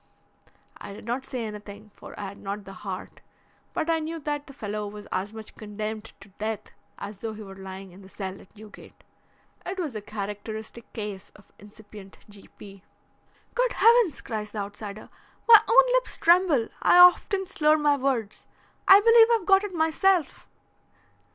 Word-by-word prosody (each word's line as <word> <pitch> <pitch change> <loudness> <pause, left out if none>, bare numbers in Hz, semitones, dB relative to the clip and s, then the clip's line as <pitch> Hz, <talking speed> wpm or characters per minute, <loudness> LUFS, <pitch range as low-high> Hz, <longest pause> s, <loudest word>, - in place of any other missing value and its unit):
I 200 - -9
did 205 - -12
not 245 +3 -3
say 250 -3 -4
anything, 210 0 -9
for - - -12
I - - -5
had 200 - -13
not 200 +1 -6
the 195 - -10
heart, 190 -1 -8 0.5
but 315 - -2
I 330 -1 +2
knew 320 +1 -5
that 290 0 -4
the - - -11
fellow 210 -4 -5
was 210 0 -9
as 190 +3 -2
much 220 -1 -10
condemned 215 +1 -6
to 200 - -14
death 215 -1 -4 0.3
as 205 -1 -8
though 225 0 -5
he 215 - -9
were 195 -1 -10
lying 190 0 -9
in 185 +3 -15
the 190 - -15
cell 195 -1 -7
at 195 - -21
Newgate. 215 0 -15 0.6
It 375 +2 -5
was 325 -8 -3
a 215 - -5
characteristic 215 +2 -7
case 205 -3 -6
of 205 - -20
incipient 205 -1 -14
G. 205 -1 -14
P." 195 -2 -13 0.7
"Good - - +1
heavens!" 460 - +4
cries 215 -4 -5
the - - -6
outsider. 205 +1 -8 0.4
"My 445 -2 +10
own - - +6
lips - - +1
tremble. 335 -9 +3
I - - +5
often 360 +2 +6
slur 310 -4 +2
my 295 -1 +3
words. 255 -6 -2 0.4
I 390 - +9
believe 460 +1 +7
I've 450 -6 +2
got 390 +1 +5
it 410 - -4
myself." 325 +2 +1
220 Hz, 175 wpm, -26 LUFS, 205-320 Hz, 0.7 s, My